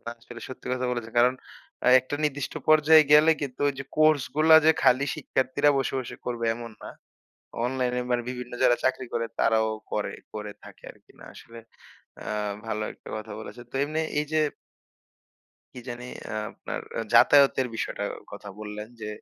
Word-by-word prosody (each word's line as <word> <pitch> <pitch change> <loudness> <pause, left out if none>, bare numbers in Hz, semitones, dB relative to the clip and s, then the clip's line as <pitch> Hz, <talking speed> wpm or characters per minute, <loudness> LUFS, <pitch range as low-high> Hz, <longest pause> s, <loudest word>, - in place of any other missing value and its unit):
ওরা 115 - -7
আসলে 120 0 -11
সত্যি 130 - -10
কথা 130 0 -1
বলেছেন 120 -2 -4
কারণ 125 +2 +4 0.5
অ্যা - - +4
একটা 130 +3 -6
নির্দিষ্ট 145 -2 -2
পর্যায়ে 155 0 +7
গেলে 150 +2 +7
কিন্তু 140 -3 -5
ওইযে 140 -1 -4
কোর্স 155 -2 +4
গুলা 160 +1 +6
যে 160 - +7
খালি 130 +2 +4
শিক্ষার্থীরা 145 0 +1
বসে, 135 - -1
বসে 130 - -6
করবে 120 -1 -3
এমন 115 -1 -8
না। - - -7 0.7
অনলাইনে 125 -1 -1
মানে 120 0 +1
বিভিন্ন 125 -1 -6
যারা 120 -1 +5
চাকরি 130 0 0
করে 115 0 0
তারাও 110 -1 +3 0.2
করে, - - -2 0.2
কোরে 105 -1 -6
থাকে - - -15
আরকি - - -24
না - - -14
আসলে, 115 0 -12 0.6
অ্যা - - -6 0.3
ভালো 110 -1 -2
একটা - - -14
কথা 110 0 -8
বলেছে। 120 +2 -9
তো - - -9
এমনি 155 +2 -2 0.2
এই 150 - -1
যে 155 - +3 1.4
কি 125 - -8
জানি 120 0 -7 0.3
আ - - -3 0.2
আপনার - - -6
অ্যা 115 - -2
যাতায়াতের 135 +1 +6
বিষয়টা 100 -2 -3 0.3
কথা 100 0 -9
বললেন 105 0 -7
যে, 110 - -5
125 Hz, 170 wpm, -26 LUFS, 115-145 Hz, 1.4 s, পর্যায়ে